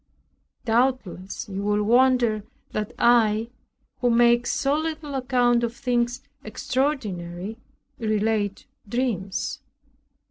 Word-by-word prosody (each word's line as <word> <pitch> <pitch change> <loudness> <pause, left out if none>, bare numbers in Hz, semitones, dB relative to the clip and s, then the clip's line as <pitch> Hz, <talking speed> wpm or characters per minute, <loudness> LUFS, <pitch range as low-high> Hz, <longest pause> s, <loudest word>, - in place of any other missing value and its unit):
Doubtless 225 -6 0
you 195 -1 -4
will 210 +1 +1
wonder 240 -2 +3 0.3
that 210 -1 -3
I, 230 -1 +3 0.5
who 245 - +2
makes 240 0 +4
so 275 +1 +1
little 315 -2 -3
account 250 -2 +2
of 235 0 -2
things 245 -1 -1 0.2
extraordinary, 215 - -2 0.4
relate 215 -2 0 0.2
dreams. 210 -6 -2
235 Hz, 95 wpm, -24 LUFS, 210-250 Hz, 0.5 s, makes